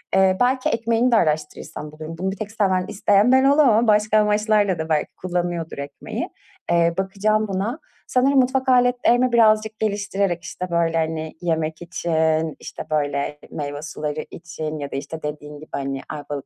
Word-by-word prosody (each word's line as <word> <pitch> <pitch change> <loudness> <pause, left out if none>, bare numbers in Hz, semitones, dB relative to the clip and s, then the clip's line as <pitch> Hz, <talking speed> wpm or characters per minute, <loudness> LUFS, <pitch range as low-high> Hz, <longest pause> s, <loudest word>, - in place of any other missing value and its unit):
Eee, 190 -1 +4
belki 255 +1 +2
ekmeğini 230 +2 +1
de - - +5
araştırırsam 150 -3 -1
bulurum. 155 +2 -8
Bunu 190 +2 -1
bir 195 - -7
tek 215 -1 -5
seven, 190 -5 +1
isteyen 205 +3 +3
ben 260 0 +5
olamam. 270 -5 +4
Başka 210 0 +4
amaçlarla 210 -3 +2
da 160 0 -4
belki 155 -2 +1
kullanıyordur 175 -2 -2
ekmeği. 140 0 -5 0.4
Eee, 170 0 +3
bakacağım 210 +3 0
buna. 200 - -2 0.3
Sanırım 270 +2 +3
mutfak 260 +1 +1
aletlerimi 245 0 +3
birazcık 220 -2 +3
geliştirerek, 200 -4 -1
işte, 180 - -5
böyle, 165 -1 +1
hani, 160 -1 -2
yemek 160 -2 -1
için, 160 -2 0
işte, - - -8
böyle, 145 -1 -1
meyve 145 -1 -5
suları 150 0 -4
için 160 -3 -6
ya 140 -1 -5
da, - - -5
işte, 150 +3 -7
dediğin 150 0 -6
gibi, 155 - -13
hani, 135 -1 -3
Ayvalık 145 -2 -6
185 Hz, 160 wpm, -22 LUFS, 155-215 Hz, 0.4 s, de